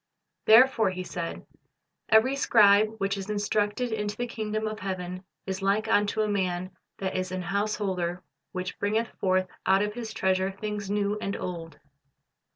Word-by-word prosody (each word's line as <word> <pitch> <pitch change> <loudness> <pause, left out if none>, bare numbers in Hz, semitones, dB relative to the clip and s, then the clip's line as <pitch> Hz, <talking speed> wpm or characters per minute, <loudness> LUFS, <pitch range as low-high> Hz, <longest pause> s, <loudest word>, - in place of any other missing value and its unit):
"Therefore," 225 -1 +6
He 185 0 -4
said, 170 -2 -5 0.6
"every 230 +5 +5
scribe 215 -4 +5
which 195 -1 0
is 195 +1 -6
instructed 210 +3 0
unto 210 -1 -2
the 245 - -2
kingdom 215 -2 -3
of 215 0 -4
heaven 185 -1 -4 0.2
is 190 0 -4
like 200 +3 +1
unto 205 0 +2
a - - 0
man 185 -2 -1 0.3
that 190 -1 -3
is 185 0 -2
an 185 -1 -3
house 200 +4 0
holder, 180 -3 -2 0.3
which 185 0 -5
bringeth 220 +3 0
forth 185 -1 +2 0.2
out 195 +1 +4
of 210 0 -2
his 225 -1 -6
treasure 190 -2 +1
things 205 0 -5
new 205 0 0
and 200 - -2
old." 165 -4 -6
200 Hz, 160 wpm, -27 LUFS, 185-215 Hz, 0.6 s, Therefore